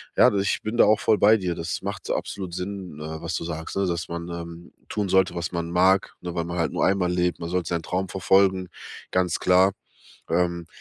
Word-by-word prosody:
ja, - - +7
d 100 - 0
ich 100 - 0
bin 110 +2 -4
da - - +7
auch 105 0 +4
voll 110 - +3
bei 105 +2 +6
dir. 90 -4 -2
Das 85 0 -4
macht - - -5
absolut 95 -3 -4
Sinn, 90 -3 -6
äh, 80 +1 -6
was 85 0 -4
du - - -3
sagst, 80 -1 -5
ne, 100 0 +1
dass 85 -1 -2
man, 85 0 -5
ähm, 85 0 -8 0.2
tun 105 -3 -2
sollte, 95 -1 +3
was 85 0 -3
man 85 -1 -3
mag, 95 +2 +3
ne, 90 -1 -6
weil 85 -1 -1
man 85 +1 -5
halt 80 - 0
nur - - +1
einmal 95 -2 +2
lebt, 90 0 0
man 85 0 -5
sollte 90 -2 -1
seinen 85 -1 -1
Traum 95 +4 -2
verfolgen, 95 0 +2 0.4
ganz 90 -2 +1
klar. 95 +1 +4 0.6
Ähm, 85 -1 0
90 Hz, 230 wpm, -25 LUFS, 85-95 Hz, 0.6 s, ja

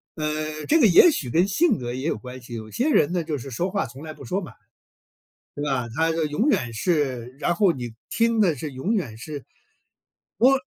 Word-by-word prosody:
呃， 155 0 -3
这 325 - +4
个 240 - +7
也 265 - +7
许 135 - -3
跟 170 +9 +3
性 305 - +2
格 120 -2 -4
也 130 +5 -3
有 - - 0
关 125 +3 -9
系， 120 -1 -9
有 110 -1 -7
些 270 +6 0
人 150 - +4
呢， 175 -2 0
就 155 -2 -3
是 135 +1 -8
说 175 +10 -1
话 200 - 0
从 130 +5 -11
来 155 -1 -7
不 - - -12
说 190 +10 -1
满。 175 - -10 1.0
对 145 - -3
吧， 130 -5 -1
他 160 +2 +2
这 165 -1 0
永 210 - 0
远 120 - +1
是 130 -2 0
然 175 - +1
后 195 0 +4
你 120 -6 -6 0.2
听 230 -1 +2
的 175 -8 +3
是， 145 +2 -5
永 135 - -2
远 135 - -2
是 145 +3 -7 0.9
我 260 +4 +6
155 Hz, 235 characters per minute, -24 LUFS, 125-185 Hz, 1.0 s, 个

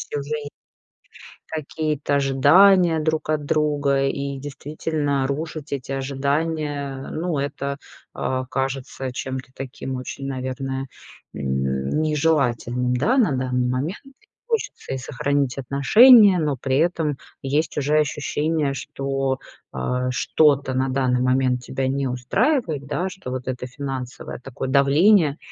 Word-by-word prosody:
уже 145 +1 -2
есть 145 -1 -7 1.0
какие-то 155 -2 -2
ожидания 160 +6 +5
друг 155 0 -1
от 150 -2 0
друга. 145 -2 +1
И 140 0 -3
действительно, 145 -1 -2
рушить 155 +1 -4
эти 135 -1 -4
ожидания, 140 0 -2
ну, 165 -2 -2
это, 140 0 -3 0.4
а, 130 0 -2
кажется 135 0 -3
чем-то 130 0 -5
таким 135 0 -6
очень, 130 +2 -6
наверное, 130 0 -4 0.5
м, 65 -1 -1
нежелательным, 125 -6 +1
да? 230 - +2
На 225 - +4
данный 125 -1 0
момент. 140 +10 -2 0.5
Хочется 455 - -3
и - - -2
сохранить 140 +1 -1
отношения, 200 - +7
но 145 -4 0
при 135 +1 0
этом 160 -3 +1 0.3
есть 145 +4 -1
уже 150 +2 +2
ощущение, 150 0 0
что, 135 0 -2 0.3
а, 125 - -2
что-то 140 0 +2
на 130 +1 0
данный 130 -2 +1
момент 130 -1 +2
тебя 130 0 -2
не 135 0 0
устраивает, 155 - 0
да, 180 +6 -1
что 190 -8 -9
вот 130 -1 -5
это 125 0 -3
финансовое 130 -2 -6
такое 130 0 -6
давление, 145 +4 +4
140 Hz, 120 wpm, -23 LUFS, 130-155 Hz, 1.0 s, отношения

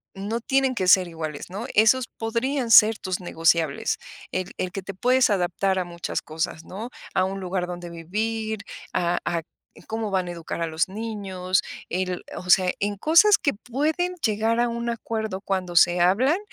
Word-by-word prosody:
no 205 +4 -3
tienen 265 0 +1
que 185 -5 -1
ser 185 0 +6
iguales, 160 -2 -6
¿no? 205 +6 -5
Esos 225 +4 +4
podrían 235 +3 -2
ser: 220 -1 +8
"Tus 185 -2 -3
negociables". 165 -4 +1 0.3
El 185 -1 -3
el 185 - -2
que 195 +2 -5
te 195 +1 -6
puedes 250 +4 +3
adaptar 190 +1 +1
a - - 0
muchas 170 -1 -4
cosas, 160 +1 -4
¿no? 215 +6 -7 0.3
A 185 - +3
un 195 +1 -4
lugar 180 -1 -2
donde 175 -1 -6
vivir, 215 +6 -3 0.3
a 175 0 +1
a 170 -1 0 0.5
cómo 220 -2 -3
van 185 -2 0
a 175 - -4
educar 170 0 -6
a 165 - 0
los 160 +3 0
niños, 195 -3 -2 0.3
el 180 0 -2
O 180 - -7
sea, 185 -1 +5
en 205 0 -1
cosas 335 - +6
que 285 - 0
pueden 305 - -1
llegar 220 +1 +1
a 240 - +3
un 235 0 -3
acuerdo, 220 -4 -3
cuando 185 -3 -2
se 175 +1 +5
hablan. 250 - +3
195 Hz, 180 wpm, -24 LUFS, 180-230 Hz, 0.5 s, ser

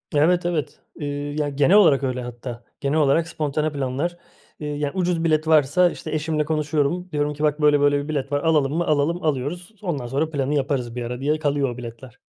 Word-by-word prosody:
Evet, 170 +4 +3
evet. 155 -4 -2 0.2
Eee, 145 - -5 0.3
ya, 150 -1 0
genel 145 +6 +3
olarak 155 -10 +6
öyle 130 -1 -1
hatta. 120 0 -7 0.2
Genel 140 +3 +1
olarak 155 +3 +3
spontane 155 -1 -1
planlar, 145 +5 -2 0.4
eee, 150 - -5
ya, 145 -1 -2
ucuz 180 -3 0
bilet 155 -1 +2
varsa, 160 +3 +4
işte, 155 - -7
eşimle 155 0 -1
konuşuyorum 155 +3 -1
diyorum 150 -1 0
ki: 150 +1 -5
"Bak, 150 0 +1
böyle 150 -1 +5
böyle 145 0 +3
bir - - -9
bilet 145 -3 -2
var, 145 0 +1
alalım 150 -4 +2
mı? 170 +2 0
Alalım." 155 +4 +1
alıyoruz. 155 +6 -2
Ondan 150 -11 -3
sonra 140 +6 -1
planı 140 -2 -1
yaparız 130 -4 -1
bir 125 - -3
ara 120 +2 -5
diye 150 +3 +1
kalıyor 145 -3 +1
o 120 - -7
biletler. 120 +1 -10
150 Hz, 205 wpm, -23 LUFS, 140-160 Hz, 0.4 s, olarak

